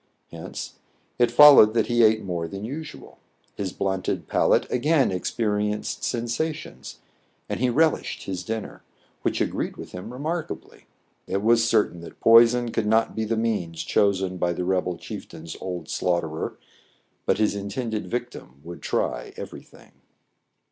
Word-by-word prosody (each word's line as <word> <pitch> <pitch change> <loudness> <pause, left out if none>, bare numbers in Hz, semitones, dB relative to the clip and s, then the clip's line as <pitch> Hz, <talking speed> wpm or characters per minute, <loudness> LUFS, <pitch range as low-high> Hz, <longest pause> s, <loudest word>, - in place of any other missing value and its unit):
Hence - - -8 0.4
it 120 -1 +4
followed 120 -4 +8
that 115 - +3
he 120 -1 +2
ate 110 0 +4
more 85 -3 -3
than 100 +4 -6
usual; 150 +6 -8 0.3
his 95 -2 -4
blunted 95 -1 -2
palate - - +3
again 140 0 +2
experienced 105 +2 -2
sensations; 125 +7 -3 0.5
and - - -3
he 125 0 +2
rel 155 +6 +4
ished - - -6
his 95 -2 -4
dinner, 110 -1 -5 0.4
which - - -1
agreed - - -2
with - - -9
him 90 +6 -7
remark 155 +6 -3
ably. - - -10 0.4
It 100 +2 -2
was 115 +1 +4
certain 105 -7 +1
that 85 - -12
poison 115 +1 +6
could 110 -2 -1
not 110 +1 +2
be 110 - -1
the 115 +1 -1
means 105 -8 -2
chosen 95 -2 +1
by 90 0 0
the 90 +1 -3
rebel 90 -1 0
chieftain's 80 0 -8
old 90 -4 -5
slaugh 90 -1 0
terer, 80 0 -5 0.7
but - - +3
his 105 -1 +2
intended 105 +2 -4
victim 120 - -6
would 85 +1 -9
try - - -2
every - - -7
thing. - - -19
110 Hz, 155 wpm, -24 LUFS, 95-120 Hz, 0.7 s, followed